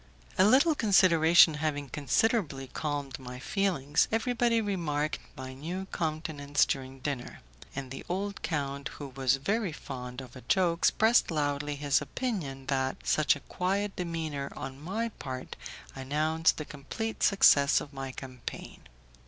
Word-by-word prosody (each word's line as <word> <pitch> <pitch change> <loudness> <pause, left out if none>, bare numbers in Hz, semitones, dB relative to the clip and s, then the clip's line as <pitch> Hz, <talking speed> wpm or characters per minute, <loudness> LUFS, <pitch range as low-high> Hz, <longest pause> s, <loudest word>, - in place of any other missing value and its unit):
A - - +5
little 275 +9 +5
consideration 175 - +6
having 145 -2 -1
considerably 150 - 0
calmed 140 0 -4
my 125 -1 -8
feelings, 150 -2 +1
everybody 230 +1 +2
remarked 165 -8 -1 0.2
my 130 0 -7
new 170 +8 -5
countenance 155 -3 0
during 130 -1 -4
dinner; 135 -3 -4 0.3
and 135 -2 -5
the 135 - -6
old 200 +2 -3
count, 140 -3 -2
who 145 -2 -7
was 130 -1 +1
very 195 +8 -1
fond 125 -4 -7
of 130 -3 -10
a 130 - -9
joke, 175 0 +2
expressed 225 +6 +4
loudly 145 -2 -1
his 145 0 +1
opinion 150 - -4
that 130 -1 -1
such 155 -2 +3
quiet 195 +2 -1
demeanour 160 -5 -3
on 135 +1 -7
my 220 +8 -2
part 130 -1 -6 0.4
announced 155 +4 +1
the 155 - -4
complete 185 +12 -5
success 140 -8 +5
of 145 - -9
my 135 -1 -5
campaign. 130 -2 -8
150 Hz, 135 wpm, -29 LUFS, 135-185 Hz, 0.4 s, consideration